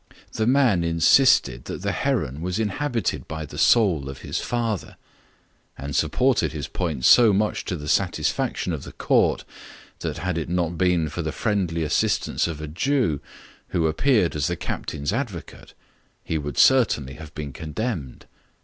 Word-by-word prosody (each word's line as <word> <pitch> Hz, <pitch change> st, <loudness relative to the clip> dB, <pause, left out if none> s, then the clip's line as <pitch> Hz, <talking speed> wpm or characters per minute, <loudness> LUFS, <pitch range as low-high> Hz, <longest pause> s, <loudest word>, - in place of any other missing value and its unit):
The 110 Hz, -, -1 dB
man 125 Hz, -9 st, +3 dB
insisted 85 Hz, -, +4 dB
that -, -, -6 dB
the -, -, 0 dB
heron 70 Hz, +5 st, -1 dB
was 90 Hz, +1 st, -2 dB
inhabited 115 Hz, +3 st, -2 dB
by 80 Hz, 0 st, -5 dB
the -, -, -8 dB
soul 90 Hz, -, +3 dB
of 70 Hz, -, -9 dB
his -, -, -3 dB
father; 115 Hz, -5 st, -3 dB, 0.8 s
and 70 Hz, +1 st, -5 dB
supported 120 Hz, -, +1 dB
his 75 Hz, -3 st, -4 dB
point 80 Hz, -7 st, -3 dB
so 120 Hz, -3 st, +7 dB
much 105 Hz, +2 st, 0 dB
to 90 Hz, -, -2 dB
the 75 Hz, -3 st, -7 dB
satisfaction 80 Hz, -4 st, 0 dB
of -, -, -4 dB
the -, -, -10 dB
court, -, -, +1 dB, 0.5 s
that -, -, -4 dB
had 90 Hz, -2 st, -2 dB
it 80 Hz, -, -5 dB
not 85 Hz, -1 st, -1 dB
been 90 Hz, -2 st, +2 dB
for 75 Hz, +4 st, -4 dB
the 80 Hz, -1 st, -3 dB
friendly 90 Hz, -6 st, -1 dB
assistance 75 Hz, -, 0 dB
of 80 Hz, -3 st, -5 dB
a 75 Hz, -, -5 dB
Jew, 90 Hz, -, 0 dB, 0.5 s
who 85 Hz, -3 st, 0 dB
appeared 95 Hz, -, +2 dB
as 75 Hz, -2 st, 0 dB
the -, -, -1 dB
captain's 75 Hz, +4 st, -4 dB
advocate, 115 Hz, -9 st, -6 dB, 0.5 s
he 80 Hz, -, -2 dB
would 75 Hz, -2 st, -6 dB
certainly 100 Hz, -, +4 dB
have 80 Hz, 0 st, -11 dB
been 75 Hz, -3 st, -6 dB
condemned. 80 Hz, -, -5 dB
85 Hz, 160 wpm, -24 LUFS, 75-110 Hz, 0.8 s, so